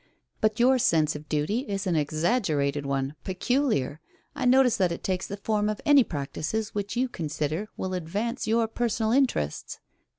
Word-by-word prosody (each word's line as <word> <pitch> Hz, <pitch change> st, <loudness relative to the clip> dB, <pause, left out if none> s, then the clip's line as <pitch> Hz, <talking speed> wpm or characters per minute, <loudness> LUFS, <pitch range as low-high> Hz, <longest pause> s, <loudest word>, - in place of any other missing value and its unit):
"But 215 Hz, 0 st, +1 dB
your 255 Hz, +2 st, +5 dB
sense 155 Hz, -8 st, +2 dB
of 150 Hz, +1 st, -9 dB
duty 155 Hz, +9 st, 0 dB
is 200 Hz, -1 st, -3 dB
an 180 Hz, -3 st, +1 dB
exaggerated 150 Hz, -, 0 dB
one 135 Hz, 0 st, -1 dB
peculiar. 190 Hz, -, 0 dB, 0.3 s
I 280 Hz, -3 st, -3 dB
notice 250 Hz, -1 st, +5 dB
that 185 Hz, -4 st, +2 dB
it 170 Hz, -, -5 dB
takes 185 Hz, -1 st, -1 dB
the 200 Hz, -, -5 dB
form 210 Hz, +1 st, 0 dB
of 215 Hz, -, -3 dB
any 285 Hz, -3 st, +7 dB
practices 165 Hz, +7 st, -3 dB
which 205 Hz, +2 st, -3 dB
you 255 Hz, +1 st, +2 dB
consider 155 Hz, -, -3 dB
will 185 Hz, 0 st, -3 dB
advance 205 Hz, +9 st, -3 dB
your 225 Hz, +1 st, +2 dB
personal 225 Hz, -1 st, -1 dB
interests." 245 Hz, -, 0 dB
200 Hz, 165 wpm, -27 LUFS, 155-235 Hz, 0.3 s, any